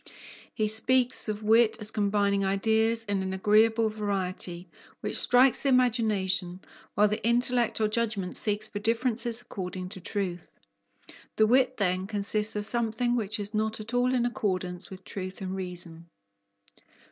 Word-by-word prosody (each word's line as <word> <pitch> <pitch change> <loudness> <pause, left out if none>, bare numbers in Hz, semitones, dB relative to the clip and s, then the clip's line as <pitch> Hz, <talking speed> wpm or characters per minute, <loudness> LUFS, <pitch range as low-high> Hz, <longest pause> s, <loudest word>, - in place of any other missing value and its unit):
He 215 - 0
speaks 245 +2 +1
of 215 0 -4
wit 220 +1 +4
as 210 0 -2
combining 200 -1 +1
ideas 220 +4 +1
in 200 -2 -1
an 190 0 -3
agreeable 220 +3 +3
variety, 190 -4 -4 0.3
which - - -3
strikes 255 +1 +4
the 280 - +1
imagination, 205 -8 +1 0.3
while 210 +1 +4
the 210 +1 -3
intellect 240 0 +2
or 215 - +2
judgment 210 -4 -2
seeks 210 -1 0
for 205 - -6
differences 230 +1 +1
according 185 -4 -6
to 190 -2 -5
truth. 180 -3 -4 0.8
The 220 - +4
wit, 255 +3 +3
then, 185 -1 0
consists 210 +1 0
of 210 0 -2
something 235 +1 +1
which 215 -3 -2
is 205 +1 -4
not 215 +1 -1
at 215 +3 -8
all 250 +1 +2
in 240 -1 +1
accordance 185 -7 -2
with 190 -1 -11
truth 185 0 -6
and 190 -1 -4
reason. 175 -3 -6
210 Hz, 150 wpm, -27 LUFS, 190-230 Hz, 0.8 s, wit